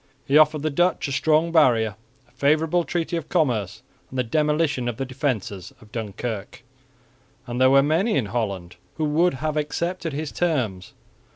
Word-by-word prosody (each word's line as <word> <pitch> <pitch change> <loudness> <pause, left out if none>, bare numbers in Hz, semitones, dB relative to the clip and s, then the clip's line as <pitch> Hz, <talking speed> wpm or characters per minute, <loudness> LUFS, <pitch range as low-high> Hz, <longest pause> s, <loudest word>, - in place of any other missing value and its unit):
He 140 - +1
offered 150 -1 +5
the 155 - 0
Dutch 175 +2 +1
a - - -4
strong 155 +5 +2
barrier, 120 -9 +4 0.3
a - - -28
favourable 155 +4 +2
treaty 170 0 -2
of 165 - -6
commerce 115 - 0 0.3
and 130 - -7
the 125 - +2
demolition 150 0 0
of 120 -2 -3
the 135 - -2
defences 120 -8 -3
of 105 - -18
Dunkirk; 110 +1 -5 0.8
and 120 0 -3
there 130 - +6
were 135 +1 +6
many 165 +10 +1
in 130 -6 +1
Holland 95 -7 -3 0.2
who 155 - 0
would 160 +2 +2
have 155 +3 -2
accepted 170 +3 -2
his 150 +1 -4
terms. 125 - -1
140 Hz, 170 wpm, -23 LUFS, 120-155 Hz, 0.8 s, there